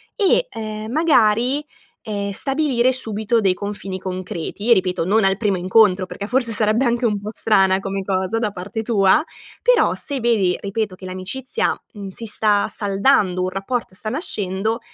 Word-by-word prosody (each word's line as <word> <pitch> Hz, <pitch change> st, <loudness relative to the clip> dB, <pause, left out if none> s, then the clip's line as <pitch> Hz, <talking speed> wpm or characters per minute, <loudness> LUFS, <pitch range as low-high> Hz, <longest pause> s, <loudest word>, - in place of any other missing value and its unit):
e, 455 Hz, +4 st, +2 dB
ehm, 215 Hz, 0 st, -6 dB
magari, 255 Hz, -2 st, +2 dB, 0.4 s
ehm, 200 Hz, -1 st, -3 dB
stabilire 265 Hz, +1 st, +1 dB
subito 225 Hz, -2 st, -1 dB
dei 190 Hz, -3 st, +3 dB
confini 200 Hz, -1 st, -5 dB
concreti, 185 Hz, +3 st, -4 dB
ripeto, 180 Hz, -3 st, 0 dB
non 215 Hz, +2 st, +3 dB
al 195 Hz, 0 st, +2 dB
primo 205 Hz, -4 st, 0 dB
incontro 185 Hz, +1 st, +3 dB
perché 200 Hz, +2 st, -7 dB
forse 245 Hz, 0 st, +1 dB
sarebbe 215 Hz, +4 st, +2 dB
anche 240 Hz, +1 st, +1 dB
un 210 Hz, -2 st, -1 dB
pò 205 Hz, +1 st, -6 dB
strana 195 Hz, -4 st, +3 dB
come 195 Hz, 0 st, -4 dB
cosa 190 Hz, +3 st, -1 dB
da 215 Hz, -3 st, -1 dB
parte 205 Hz, +4 st, -5 dB
tua, 215 Hz, +5 st, +3 dB, 0.4 s
però -, -, +4 dB
se 285 Hz, -3 st, -1 dB
vedi, 215 Hz, -7 st, +2 dB
ripeto, 205 Hz, 0 st, -3 dB
che 185 Hz, -, -12 dB
l'amicizia, 185 Hz, +8 st, -3 dB, 0.2 s
mhmm, 200 Hz, -2 st, -7 dB
si 230 Hz, +4 st, -5 dB
sta 210 Hz, -1 st, +2 dB
saldando, 200 Hz, -2 st, +2 dB
un 185 Hz, -, -1 dB
rapporto 195 Hz, +2 st, -4 dB
sta 215 Hz, -, -1 dB
nascendo, 215 Hz, -, -1 dB
210 Hz, 160 wpm, -20 LUFS, 190-235 Hz, 0.4 s, però